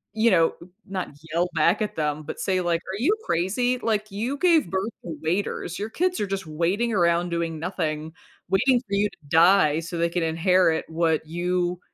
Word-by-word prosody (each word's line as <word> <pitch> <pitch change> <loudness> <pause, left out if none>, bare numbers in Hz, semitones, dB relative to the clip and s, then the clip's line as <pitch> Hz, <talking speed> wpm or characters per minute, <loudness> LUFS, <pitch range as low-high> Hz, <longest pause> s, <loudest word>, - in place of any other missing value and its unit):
you 225 +1 +4
know, 165 -3 +4 0.3
not 190 -1 -3 0.2
yell 175 +2 +1
back 170 +7 +3
at 210 - -2
them 150 -1 -1
but 150 - -7
say, 185 -1 0
like, 170 -1 0
"Are 190 +2 -6
you 350 - +3
crazy? 245 +9 0
Like, 215 -1 -1
you 235 +8 -3
gave 335 -3 +3
birth 190 +4 -2
to 160 -3 -6
waiters, 175 +1 -2
your 210 +2 -3
kids 360 +7 0
are 205 - -1
just 195 -2 -3
waiting 180 +9 0
around 175 -1 +2
doing 170 -1 -2
nothing, 160 -3 -3 0.4
waiting 245 +7 +3
for 200 - -6
you 205 +1 +2
to - - -21
die 165 -2 +5
so 165 +1 -6
they 170 0 +1
can 175 0 -2
inherit 165 0 +2
what 160 -1 0
you 175 +1 -1
180 Hz, 190 wpm, -24 LUFS, 165-205 Hz, 0.4 s, die